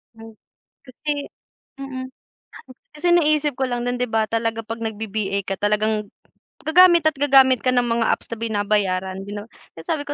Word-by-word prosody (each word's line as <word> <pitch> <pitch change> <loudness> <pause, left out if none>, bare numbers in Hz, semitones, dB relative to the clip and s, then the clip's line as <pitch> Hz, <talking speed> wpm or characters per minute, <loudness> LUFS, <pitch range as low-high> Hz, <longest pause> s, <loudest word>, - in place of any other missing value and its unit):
Hmm 225 0 -12 0.5
Kasi, 280 +3 -6 0.7
mm. 265 -1 -6 0.9
Kasi 300 +4 -3
naisip 305 -4 +2
ko 265 - 0
lang 245 0 -2
dun 245 0 -2
di - - +2
ba 220 -1 +1
talaga 225 0 -1
pag 225 +1 -6
nagvi 220 -1 -4
VA 200 -1 -2
ka 195 - -2
talagang 210 0 0 0.5
gagamit 345 +1 +6
at 310 - -13
gagamit 265 -3 +4
ka 255 - +3
ng 245 - +3
mga 230 -1 0
apps - - -6
na 230 - -5
binabayaran 200 -3 -1
din 205 +1 -6
no. 215 - -14 0.2
Kaya 165 - -10
sabi 290 -3 -2
ko 290 - -4
230 Hz, 180 wpm, -22 LUFS, 210-275 Hz, 0.9 s, gagamit